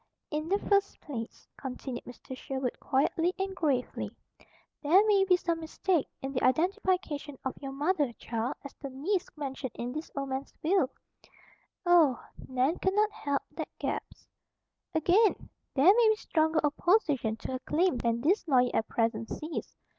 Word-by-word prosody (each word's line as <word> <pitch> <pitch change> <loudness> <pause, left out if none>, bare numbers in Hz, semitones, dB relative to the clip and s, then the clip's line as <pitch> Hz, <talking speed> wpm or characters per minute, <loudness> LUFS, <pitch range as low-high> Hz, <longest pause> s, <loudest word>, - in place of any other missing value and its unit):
"In 305 +2 -2
the 395 - +3
first 400 -1 +1
place," 235 -6 -7
continued 255 -1 -6
Mr. 250 +1 -9
Sherwood 265 -1 -3
quietly 325 +6 +1
and 385 0 -2
gravely, 285 -8 -1 0.7
"there 360 +8 +5
may 405 -2 +5
be 365 -2 +5
some 335 -2 -1
mistake 325 0 0 0.2
in 270 - -2
the 255 - -1
identification 315 - +1
of 265 - -1
your 275 -1 -5
mother, 290 -1 +1
child, 230 +3 -3
as 280 - -8
the 275 - -4
niece 345 +9 -1
mentioned 270 -3 -4
in 240 +1 -4
this 310 +4 -5
old 275 -1 -2
man's 265 +1 -4
will." 335 -4 +3 1.0
"Oh!" 330 -8 +5 0.3
Nan 260 +5 +1
could 380 +1 +1
not 425 0 +3
help 285 -8 -2
that - - -5
gasp. - - -4 0.7
"Again, 370 +7 +3 0.2
there 275 +1 +3
may 460 0 +5
be 435 - +4
stronger 315 -5 +1
opposition 295 - +2
to 225 - -6
her 255 - -2
claim 330 +2 +1
than 235 -1 0
this 360 - +2
lawyer 250 -4 +4
at 225 - +1
present 230 0 0
sees. 310 +2 -5
295 Hz, 160 wpm, -30 LUFS, 260-365 Hz, 1.0 s, there